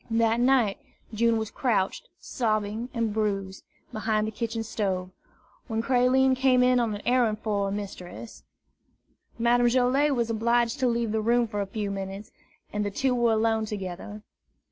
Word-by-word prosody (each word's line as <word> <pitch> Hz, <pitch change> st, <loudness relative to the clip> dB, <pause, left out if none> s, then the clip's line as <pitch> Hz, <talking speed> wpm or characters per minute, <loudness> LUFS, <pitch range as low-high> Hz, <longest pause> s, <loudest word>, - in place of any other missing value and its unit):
That 225 Hz, 0 st, +2 dB
night, 245 Hz, -5 st, +3 dB, 0.3 s
June 230 Hz, +1 st, +2 dB
was 220 Hz, -1 st, -3 dB
crouched, 235 Hz, -, -1 dB
sobbing 215 Hz, 0 st, -2 dB
and 230 Hz, -3 st, -1 dB
bruised, 195 Hz, -3 st, -2 dB, 0.3 s
behind 215 Hz, 0 st, 0 dB
the 215 Hz, -, -3 dB
kitchen 225 Hz, +1 st, -3 dB
stove, 190 Hz, -4 st, -2 dB, 0.6 s
when 225 Hz, -2 st, -2 dB
Creline 260 Hz, +1 st, +3 dB
came 255 Hz, -1 st, +3 dB
in 250 Hz, 0 st, +4 dB
on 225 Hz, -3 st, 0 dB
an 205 Hz, -, -9 dB
errand 240 Hz, -4 st, +2 dB
for 205 Hz, -2 st, 0 dB
her -, -, -4 dB
mistress. 200 Hz, +1 st, -7 dB, 1.0 s
Madame 240 Hz, +1 st, +3 dB
Joilet 260 Hz, +4 st, +2 dB
was 235 Hz, -2 st, 0 dB
obliged 235 Hz, +3 st, +1 dB
to 260 Hz, -, +2 dB
leave 235 Hz, -2 st, 0 dB
the 220 Hz, 0 st, 0 dB
room 235 Hz, +2 st, +2 dB
for 205 Hz, -2 st, -3 dB
a 200 Hz, -, -3 dB
few 205 Hz, 0 st, -3 dB
minutes, 195 Hz, +1 st, -6 dB, 0.4 s
and 210 Hz, 0 st, -1 dB
the 205 Hz, -, -1 dB
two 255 Hz, +6 st, 0 dB
were 240 Hz, -2 st, +2 dB
alone 220 Hz, 0 st, +1 dB
together. 205 Hz, 0 st, -6 dB
225 Hz, 165 wpm, -26 LUFS, 210-240 Hz, 1.0 s, in